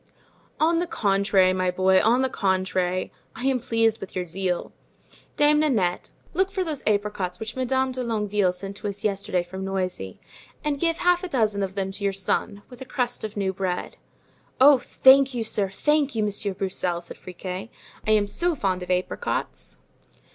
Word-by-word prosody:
"On 330 Hz, +2 st, +3 dB
the 350 Hz, -, -1 dB
contrary, 195 Hz, -, +2 dB
my 185 Hz, -1 st, 0 dB
boy, 185 Hz, +1 st, +3 dB
on 240 Hz, +4 st, +3 dB
the -, -, +2 dB
contrary, 185 Hz, -4 st, 0 dB, 0.2 s
I 245 Hz, -, -5 dB
am 265 Hz, -2 st, +2 dB
pleased 225 Hz, -1 st, +1 dB
with 195 Hz, -, -8 dB
your 180 Hz, -1 st, -1 dB
zeal. 180 Hz, +1 st, -2 dB, 0.7 s
Dame 295 Hz, 0 st, +5 dB
Nanette, 215 Hz, -13 st, +1 dB, 0.2 s
look 380 Hz, +1 st, +2 dB
for 385 Hz, -1 st, -1 dB
those 310 Hz, -5 st, -3 dB
apricots 205 Hz, -4 st, 0 dB
which 220 Hz, +1 st, -6 dB
Madame 260 Hz, 0 st, 0 dB
de 255 Hz, 0 st, -3 dB
Longueville 210 Hz, -5 st, +1 dB
sent 195 Hz, +2 st, -6 dB
to 210 Hz, -, -5 dB
us 200 Hz, 0 st, -5 dB
yesterday 195 Hz, -3 st, 0 dB
from 190 Hz, +2 st, -7 dB
Noisy 185 Hz, -, -3 dB, 0.4 s
and 290 Hz, -2 st, -1 dB
give 330 Hz, +1 st, +1 dB
half 355 Hz, +1 st, +2 dB
a -, -, -2 dB
dozen 215 Hz, -, +1 dB
of 195 Hz, 0 st, -3 dB
them 195 Hz, -1 st, -2 dB
to 200 Hz, +1 st, -7 dB
your 200 Hz, -1 st, +1 dB
son, 195 Hz, +1 st, -2 dB
with 250 Hz, -1 st, -14 dB
a -, -, -6 dB
crust 250 Hz, -2 st, -2 dB
of 215 Hz, -1 st, -5 dB
new 190 Hz, -1 st, 0 dB
bread." 185 Hz, -1 st, -3 dB, 0.6 s
"Oh, 275 Hz, 0 st, +8 dB
thank 265 Hz, +1 st, +5 dB
you, 235 Hz, -, -1 dB
sir, 205 Hz, -3 st, 0 dB
thank 290 Hz, +6 st, +1 dB
you, 220 Hz, -, +1 dB
Monsieur 205 Hz, -1 st, -1 dB
Broussel," 185 Hz, -2 st, -1 dB
said 175 Hz, -, -9 dB
Friquet; 185 Hz, +3 st, -7 dB, 0.4 s
"I -, -, +1 dB
am 215 Hz, -1 st, +4 dB
so 345 Hz, +11 st, +1 dB
fond 190 Hz, -7 st, -1 dB
of 180 Hz, -, -7 dB
apricots!" 180 Hz, 0 st, -2 dB
205 Hz, 185 wpm, -25 LUFS, 190-260 Hz, 0.7 s, Oh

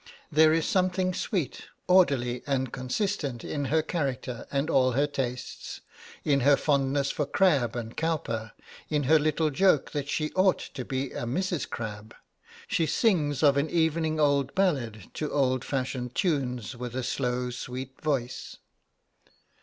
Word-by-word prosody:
There 155 Hz, +1 st, +6 dB
is 160 Hz, 0 st, +2 dB
something 185 Hz, 0 st, +1 dB
sweet, 175 Hz, -, -2 dB, 0.2 s
orderly, 135 Hz, -10 st, +3 dB
and 130 Hz, -3 st, -1 dB
consistent 135 Hz, -, -2 dB
in 145 Hz, -1 st, -3 dB
her 155 Hz, +3 st, +2 dB
character 135 Hz, -7 st, -3 dB
and 140 Hz, +2 st, 0 dB
all 130 Hz, -5 st, +3 dB
her 140 Hz, +4 st, +3 dB
tastes 125 Hz, -4 st, -4 dB, 0.5 s
in 140 Hz, -2 st, +3 dB
her 140 Hz, +2 st, +5 dB
fondness 140 Hz, -1 st, +1 dB
for 150 Hz, -, -2 dB
Crabbe 140 Hz, -, +2 dB
and 115 Hz, -1 st, -5 dB
Cowper, 115 Hz, -9 st, -2 dB, 0.4 s
in 150 Hz, -1 st, +1 dB
her 155 Hz, +4 st, +5 dB
little 155 Hz, +1 st, +1 dB
joke 175 Hz, -1 st, +3 dB
that 145 Hz, -1 st, -3 dB
she 155 Hz, 0 st, -1 dB
ought 185 Hz, 0 st, +4 dB
to 130 Hz, -, -7 dB
be 130 Hz, +1 st, -3 dB
a -, -, -4 dB
Mrs. 175 Hz, +4 st, -2 dB
Crabbe. 105 Hz, -1 st, -6 dB, 0.5 s
She 165 Hz, -, +1 dB
sings 155 Hz, -, +1 dB
of 140 Hz, -1 st, +5 dB
an 145 Hz, +2 st, +1 dB
evening 160 Hz, -1 st, +1 dB
old 140 Hz, -2 st, +2 dB
ballads 130 Hz, -, 0 dB
to 150 Hz, -, -3 dB
old 130 Hz, -3 st, +1 dB
fashioned 130 Hz, -2 st, -3 dB
tunes 130 Hz, -, -1 dB
with 125 Hz, 0 st, -6 dB
a 130 Hz, -1 st, -2 dB
low 125 Hz, 0 st, -1 dB
sweet 125 Hz, +2 st, -7 dB
voice. 135 Hz, -5 st, -2 dB
140 Hz, 150 wpm, -28 LUFS, 125-160 Hz, 0.5 s, There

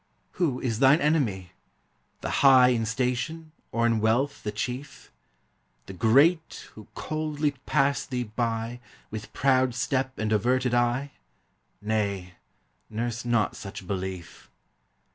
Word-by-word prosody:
Who 145 Hz, -8 st, -1 dB
is 115 Hz, -4 st, -2 dB
thine 135 Hz, +3 st, +6 dB
enemy? 120 Hz, -, 0 dB, 0.7 s
The -, -, -3 dB
high 130 Hz, -2 st, +7 dB
In 115 Hz, -3 st, 0 dB
station, 130 Hz, +7 st, -2 dB, 0.2 s
or 115 Hz, 0 st, +1 dB
in 115 Hz, -1 st, +2 dB
wealth 120 Hz, +6 st, +1 dB
the 105 Hz, -, -3 dB
chief? 125 Hz, +6 st, -6 dB, 0.7 s
The 95 Hz, -, -9 dB
great, 140 Hz, -, +2 dB
who 110 Hz, -, -13 dB
coldly 155 Hz, -1 st, -2 dB, 0.2 s
pass 140 Hz, -1 st, +2 dB
thee 125 Hz, -1 st, -2 dB
by, 115 Hz, +1 st, -3 dB, 0.3 s
With 105 Hz, 0 st, -7 dB
proud 130 Hz, -2 st, +2 dB
step 130 Hz, +1 st, -1 dB
and 110 Hz, 0 st, -1 dB
averted 125 Hz, +4 st, +1 dB
eye? 120 Hz, +3 st, +1 dB, 0.7 s
Nay! 100 Hz, -4 st, -2 dB, 0.6 s
nurse 115 Hz, +1 st, -3 dB
not 115 Hz, -4 st, +1 dB
such 100 Hz, -1 st, -8 dB
belief. 95 Hz, -2 st, -6 dB
120 Hz, 125 wpm, -26 LUFS, 110-135 Hz, 0.7 s, high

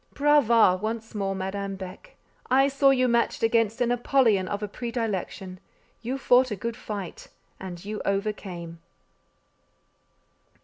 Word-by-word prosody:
Brava! 235 Hz, -10 st, +4 dB
once 225 Hz, +1 st, -4 dB
more, 195 Hz, -2 st, -2 dB
Madame 195 Hz, +1 st, -4 dB
Beck. 190 Hz, -, -10 dB, 0.3 s
I 270 Hz, +2 st, +4 dB
saw 275 Hz, 0 st, +3 dB
you 255 Hz, -2 st, +3 dB
matched 235 Hz, -1 st, +1 dB
against 230 Hz, +1 st, +2 dB
an 240 Hz, 0 st, +2 dB
Apollyon 240 Hz, -6 st, +2 dB
of 205 Hz, +2 st, -3 dB
a -, -, -2 dB
predilection; 205 Hz, -5 st, -4 dB, 0.4 s
you 250 Hz, +4 st, -3 dB
fought 255 Hz, -1 st, +4 dB
a 210 Hz, -, -2 dB
good 230 Hz, +4 st, -4 dB
fight, 200 Hz, -6 st, -7 dB, 0.3 s
and 180 Hz, -1 st, -8 dB
you 210 Hz, +1 st, -4 dB
overcame! 195 Hz, -4 st, -3 dB
215 Hz, 130 wpm, -26 LUFS, 195-245 Hz, 0.4 s, Brava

